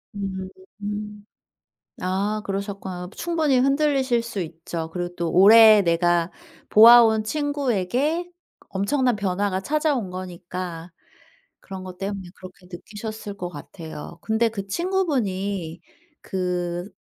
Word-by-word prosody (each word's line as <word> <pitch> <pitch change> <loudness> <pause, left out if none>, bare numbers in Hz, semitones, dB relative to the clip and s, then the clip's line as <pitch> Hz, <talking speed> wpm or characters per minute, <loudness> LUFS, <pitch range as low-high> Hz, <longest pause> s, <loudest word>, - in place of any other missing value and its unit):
음. 205 - -6 0.8
아 200 +3 -1
그러셨구나. 195 -2 -5
충분히 320 -6 +1
흔들리실 275 -3 +2
수 230 -4 -5
있죠. 165 -1 -5
그리고 175 0 -4
또 170 -1 -2
오래 215 +2 +8
내가 170 0 +1 0.4
보아온 225 0 +8
친구에게 285 - -1 0.4
엄청난 245 +5 +1
변화가 195 -1 -1
찾아온 290 - 0
거니까 180 -1 -7 0.7
그런 190 -1 -8
것 185 -1 -9
때문에 195 -1 -5
그렇게 185 0 -13
느끼셨을 210 +3 -7
것 180 -2 -4
같아요. 160 +1 -9
근데 225 +1 +1
그 200 -3 -6
친구분이 200 - -2 0.4
그 180 -1 -3
200 Hz, 245 characters per minute, -23 LUFS, 180-235 Hz, 0.8 s, 오래